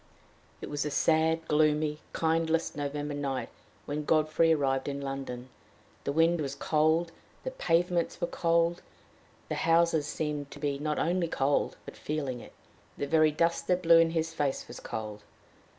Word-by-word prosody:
It - - -6
was 145 -1 -1
a 150 - -2
sad, 160 +2 +2
gloomy, 150 0 +2
kindless 165 0 0
November 145 0 -3
night, 140 -2 -3 0.4
when 150 +1 -3
Godfrey 155 +2 +3
arrived 135 -3 +1
in 140 0 -3
London. 135 -2 -5 0.6
The - - 0
wind 165 +2 +3
was 140 -1 -3
cold, 160 +3 +2 0.3
the - - -3
pavements 175 - 0
were 175 - +1
cold, 170 0 +1 0.7
the - - -3
houses 165 -2 +3
seemed 150 -2 -3
to 145 - -11
be 140 -1 -1
not 150 +1 -1
only 175 +1 +1
cold 140 -2 0
but - - -9
feeling 140 -5 -3
it. - - -13 0.4
The - - -2
very 155 +1 +4
dust 165 +3 0
that 180 0 +1
blow 165 0 +7
in 165 0 +4
his 165 0 -1
face 145 -4 -1
was - - -9
cold. 105 -1 -6
155 Hz, 160 wpm, -29 LUFS, 145-165 Hz, 0.7 s, blow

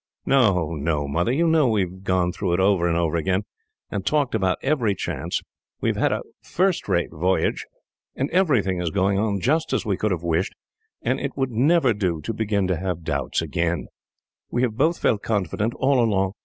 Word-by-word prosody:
"No, 100 - +3
no, 75 -1 -1
Mother, 85 +10 0
you 160 +6 +2
know 160 -4 +4
we 110 -4 +2
have 95 +1 -5
gone 90 -2 +1
through 90 -1 -2
it 90 - +1
over 95 -2 +3
and 85 -1 +1
over 85 -1 +1
again, 95 +4 0 0.5
and - - -2
talked 145 -4 +1
about 95 -4 +1
every 125 -8 +1
chance. - - -3 0.4
We - - 0
have - - 0
had - - +1
a - - -1 0.2
first 185 0 0
rate 85 - +1
voyage, 90 +4 0 0.5
and 135 - -1
everything 120 - +2
is 85 - -1
going 100 +2 +1
on 105 -2 0
just 155 - +1
as - - 0
we 100 -3 0
could 105 - 0
have 90 -4 -2
wished, 85 +2 0 0.5
and - - 0
it - - -4
would 135 -2 0
never 135 +2 +3
do 90 -6 -1
to 115 - -3
begin 105 -3 0
to 90 - +1
have 90 -1 -3
doubts 70 -5 -1
now. 85 0 +2 0.7
We 120 - 0
have 115 -4 0
both 160 +8 +2
felt 105 -4 +1
confident, 105 +2 -1
all 130 -2 +3
along. 95 -4 +1
100 Hz, 200 wpm, -23 LUFS, 90-125 Hz, 0.7 s, know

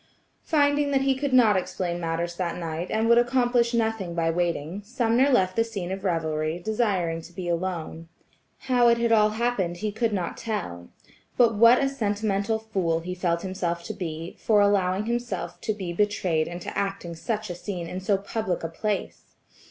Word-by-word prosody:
Finding 290 -2 +2
that 275 -1 +2
he 270 0 +3
could 275 +1 -2
not 235 -5 +5
explain 180 -1 -2
matters 170 +1 -2
that 175 -1 -2
night, 165 +1 -4
and 220 +1 +1
would 235 +1 +6
accomplish 240 -1 +2
nothing 220 -7 -1
by 165 -1 +1
waiting, 170 +1 -2
Sumner 240 +3 +2
left 185 -8 +2
the 230 - +3
scene 200 -6 -5
of 190 0 -5
revelry, 160 -3 -1
desiring 185 -5 -1
to 165 - -13
be 175 0 -6
alone. 170 -2 -3 0.5
How 245 -2 +3
it 235 0 +5
had 235 0 +1
all 215 -1 +5
happened 215 -6 -1
he 215 +3 -2
could 220 +2 0
not 185 -4 -2
tell. 90 - -4 0.5
But 235 -2 +5
what 230 +4 +7
a 275 - +2
sentimental 210 -4 -1
fool 190 -7 -1
he 180 +2 -5
felt 175 -2 -1
himself 175 -3 -2
to - - -5
be, 165 -1 -6
for 215 -2 +3
allowing 200 -1 +2
himself 240 +1 -3
to - - -1
be 190 -5 -4
betrayed 180 -5 +1
into 175 +1 -6
acting 195 -4 -3
such 210 +4 -3
a - - -3
scene 175 0 -5
in 180 - -5
so 195 +1 +1
public 200 -2 -3
a 165 - -2
place. 205 +5 -4
195 Hz, 185 wpm, -26 LUFS, 175-230 Hz, 0.5 s, what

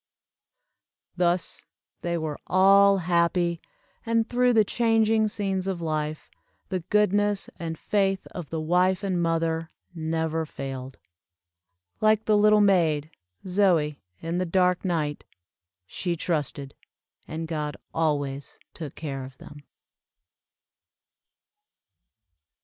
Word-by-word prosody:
Thus 175 0 0 0.3
they 170 0 -1
were 155 -2 -4
all 195 +1 +6
happy, 170 -1 +1 0.4
and, 230 -1 +1
through 250 0 +2
the 220 -2 +5
changing 225 -1 +2
scenes 195 -3 -2
of 190 -3 -2
life, 155 -2 -3 0.4
the 185 -2 -1
goodness 205 +2 +1
and 165 -1 -4
faith 195 0 0
of 175 -5 -7
the 165 - -3
wife 180 +4 +2
and 185 -3 0
mother, 165 -1 0 0.2
never 160 -1 -1
failed. 135 -3 -7 1.0
Like 215 0 +3
the 215 - +3
little 210 0 +5
maid, 165 -6 +2 0.3
Zoie, 180 -6 +2 0.2
in 165 +2 -2
the 185 - -1
dark 180 +1 +2
night, 155 -5 -1 0.6
she 170 - -3
trusted, 150 -4 -2 0.5
and 160 +1 -5
God 150 -2 -3 0.2
always 145 -3 -1 0.2
took 155 -4 -7
care 140 -4 -5
of 130 +1 -11
them. 145 0 -12
170 Hz, 110 wpm, -26 LUFS, 155-195 Hz, 1.0 s, all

